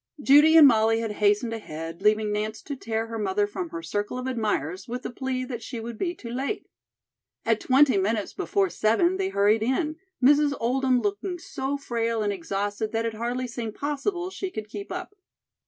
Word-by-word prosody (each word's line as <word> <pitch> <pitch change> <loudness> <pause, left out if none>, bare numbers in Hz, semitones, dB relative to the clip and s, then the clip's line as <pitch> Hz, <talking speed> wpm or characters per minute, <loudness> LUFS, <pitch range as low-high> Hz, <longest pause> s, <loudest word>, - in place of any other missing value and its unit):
Judy 295 +4 +7
and 305 -3 +10
Molly 225 -2 +4
had 225 -2 -2
hastened 210 +3 +3
ahead, 165 -6 -7
leaving 215 0 +3
Nance 215 +1 -3
to 285 - -5
tear 225 -3 -2
her 225 0 -5
mother 205 0 +1
from 185 -4 -5
her 165 0 -6
circle 205 +8 -3
of 255 - -4
admirers 205 - -2
with 245 +2 -5
the - - -4
plea 255 +1 -3
that 245 -2 -5
she 240 -1 -6
would 230 0 -7
be 350 -1 -1
too 235 -7 -8
late. 270 - -3 0.8
At - - +2
twenty 265 -3 +4
minutes 210 +1 -1
before 390 -1 0
seven 340 +13 +2
they 385 0 -1
hurried 210 - +3
in, 300 +7 0 0.2
Mrs. 285 +2 +5
Oldham 255 +1 +2
looking 210 - -2
so 280 -4 -4
frail 230 -4 -1
and 205 -1 0
exhausted 205 +4 -3
that 225 0 0
it 230 - -2
hardly 240 +3 -2
seemed 235 -3 -5
possible 350 +6 -2
she 380 0 -4
could 215 -10 -7
keep 205 -2 -7
up. 365 +2 -5
230 Hz, 190 wpm, -26 LUFS, 210-275 Hz, 0.8 s, and